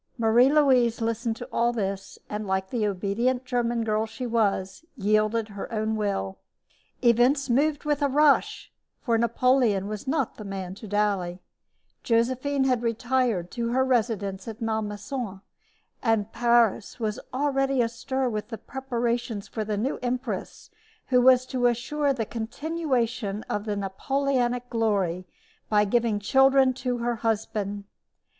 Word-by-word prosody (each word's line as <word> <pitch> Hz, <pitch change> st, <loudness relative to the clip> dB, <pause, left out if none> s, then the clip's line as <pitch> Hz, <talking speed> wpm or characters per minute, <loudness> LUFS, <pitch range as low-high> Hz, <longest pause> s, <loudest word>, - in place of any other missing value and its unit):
Marie 235 Hz, +3 st, +4 dB
Louise 255 Hz, -6 st, +4 dB
listened 230 Hz, 0 st, -1 dB
to -, -, -8 dB
all 235 Hz, +1 st, +2 dB
this, 195 Hz, -4 st, -4 dB
and, 210 Hz, 0 st, -4 dB
like 190 Hz, 0 st, -1 dB
the 225 Hz, -4 st, 0 dB
obedient 215 Hz, +7 st, -1 dB
German 240 Hz, -2 st, 0 dB
girl 215 Hz, 0 st, 0 dB
she 225 Hz, +3 st, -6 dB
was, 215 Hz, -1 st, 0 dB
yielded 215 Hz, +1 st, +1 dB
her 200 Hz, +2 st, -7 dB
own 220 Hz, 0 st, -1 dB
will. 95 Hz, -, -2 dB, 0.6 s
Events 245 Hz, +3 st, +3 dB
moved 290 Hz, +4 st, +2 dB
with 295 Hz, -1 st, 0 dB
a 285 Hz, -, +3 dB
rush, 290 Hz, +1 st, +2 dB, 0.3 s
for 235 Hz, -3 st, 0 dB
Napoleon 235 Hz, -3 st, +2 dB
was 210 Hz, +5 st, -6 dB
not 275 Hz, -3 st, -1 dB
the 215 Hz, -, -7 dB
man 190 Hz, -2 st, -5 dB
to 215 Hz, +3 st, -10 dB
dally. 200 Hz, -3 st, 0 dB, 0.6 s
Josephine 255 Hz, +4 st, +1 dB
had 255 Hz, -3 st, +2 dB
retired 235 Hz, -5 st, 0 dB
to 235 Hz, -1 st, -2 dB
her 260 Hz, +1 st, +3 dB
residence 215 Hz, -6 st, -1 dB
at 225 Hz, 0 st, -7 dB
Malmaison, 220 Hz, -1 st, -3 dB, 0.6 s
and 225 Hz, -3 st, +1 dB
Paris 235 Hz, -2 st, +2 dB
was 220 Hz, +1 st, -2 dB
already 270 Hz, 0 st, +1 dB
astir 255 Hz, +3 st, -1 dB
with 215 Hz, 0 st, -4 dB
preparations 240 Hz, -4 st, -2 dB
for 220 Hz, -, -4 dB
the 210 Hz, -1 st, -2 dB
new 250 Hz, +7 st, -1 dB
empress 245 Hz, -5 st, -4 dB, 0.4 s
who 250 Hz, -1 st, +4 dB
was 255 Hz, 0 st, +6 dB
to 255 Hz, -1 st, +1 dB
assure 280 Hz, +5 st, 0 dB
the 240 Hz, -5 st, -2 dB
continuation 240 Hz, -3 st, -2 dB
of 210 Hz, 0 st, -3 dB
the 210 Hz, -2 st, -2 dB
Napoleonic 245 Hz, +5 st, -1 dB
glory 195 Hz, -7 st, 0 dB, 0.4 s
by 210 Hz, -1 st, +4 dB
giving 230 Hz, 0 st, +1 dB
children 265 Hz, +4 st, +4 dB
to 250 Hz, -1 st, -2 dB
her 240 Hz, 0 st, -1 dB
husband. 210 Hz, -2 st, -2 dB
230 Hz, 140 wpm, -26 LUFS, 210-255 Hz, 0.6 s, was